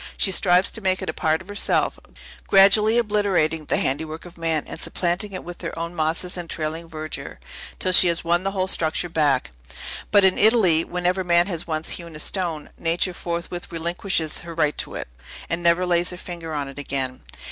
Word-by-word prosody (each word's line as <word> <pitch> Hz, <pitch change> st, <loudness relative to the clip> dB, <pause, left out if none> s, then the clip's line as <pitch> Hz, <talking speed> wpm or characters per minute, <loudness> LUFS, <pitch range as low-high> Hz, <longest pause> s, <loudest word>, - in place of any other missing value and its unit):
She 195 Hz, -, +3 dB
strives 180 Hz, 0 st, +4 dB
to 225 Hz, -, -6 dB
make 185 Hz, -1 st, 0 dB
it -, -, -2 dB
a -, -, -20 dB
part 160 Hz, +3 st, 0 dB
of -, -, -22 dB
herself, 205 Hz, 0 st, +1 dB, 0.5 s
gradually 210 Hz, +3 st, +5 dB
obliterating 195 Hz, -8 st, +1 dB
the -, -, +1 dB
handiwork 155 Hz, +4 st, -2 dB
of 175 Hz, 0 st, -12 dB
man, 165 Hz, -2 st, -1 dB
and -, -, -8 dB
supplanting 180 Hz, +3 st, -1 dB
it 185 Hz, -, -6 dB
with 175 Hz, 0 st, -8 dB
her -, -, -5 dB
own 170 Hz, +1 st, -4 dB
mosses 165 Hz, +3 st, -2 dB
and 175 Hz, -2 st, -6 dB
trailing 160 Hz, +1 st, -4 dB
verdure, 155 Hz, -1 st, -7 dB, 0.4 s
till 185 Hz, -, +1 dB
she 185 Hz, -, +7 dB
has 170 Hz, -1 st, +1 dB
won 175 Hz, +1 st, +2 dB
the 195 Hz, -, -1 dB
whole 190 Hz, -1 st, -1 dB
structure 170 Hz, -1 st, +1 dB
back. 145 Hz, -, +1 dB, 0.6 s
But, 205 Hz, -1 st, +5 dB
in 190 Hz, -, +4 dB
Italy, 200 Hz, -7 st, +5 dB
whenever 180 Hz, +2 st, -1 dB
man 175 Hz, -1 st, +3 dB
has 175 Hz, -4 st, -4 dB
once 155 Hz, -1 st, -2 dB
hewn 170 Hz, -2 st, -6 dB
a -, -, -6 dB
stone, 165 Hz, -1 st, -2 dB
Nature 170 Hz, +2 st, 0 dB
forthwith 175 Hz, 0 st, -5 dB
relinquishes 170 Hz, -1 st, -2 dB
her 170 Hz, -1 st, -9 dB
right 150 Hz, -2 st, +1 dB
to -, -, -3 dB
it, -, -, -5 dB, 0.4 s
and 165 Hz, +1 st, -1 dB
never 170 Hz, +1 st, +3 dB
lays 175 Hz, 0 st, +2 dB
her 180 Hz, -, -4 dB
finger 170 Hz, -3 st, -7 dB
on 145 Hz, -2 st, -3 dB
it 135 Hz, +1 st, -9 dB
again. 135 Hz, -2 st, -3 dB
170 Hz, 200 wpm, -23 LUFS, 160-185 Hz, 0.6 s, she